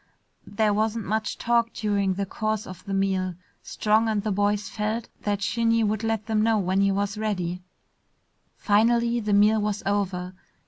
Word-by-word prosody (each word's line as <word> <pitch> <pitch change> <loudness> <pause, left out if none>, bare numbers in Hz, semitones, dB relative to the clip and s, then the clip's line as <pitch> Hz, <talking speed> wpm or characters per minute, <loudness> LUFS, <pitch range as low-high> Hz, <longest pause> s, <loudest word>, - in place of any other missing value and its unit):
There 210 0 +1
wasn't 220 +1 -1
much 220 +2 -2
talk 235 -1 +1
during 200 -3 0
the 200 +1 -2
course 215 +2 -2
of 185 -1 -10
the 195 - -4
meal. 190 -2 0 0.3
Strong 220 +1 +1
and 210 -2 0
the 215 - -1
boys 205 +1 0
felt 215 +2 -3
that 205 -1 -1
Shinny 230 +1 +2
would 215 +1 -1
let 225 -2 -1
them 220 -1 +1
know 225 0 +3
when 190 0 +1
he 200 0 +3
was 200 +1 -2
ready. 185 -5 -2 1.0
Finally 235 +3 +2
the 210 -2 -1
meal 210 +2 +4
was 210 -1 -2
over. 190 -2 -1
210 Hz, 170 wpm, -25 LUFS, 200-220 Hz, 1.0 s, meal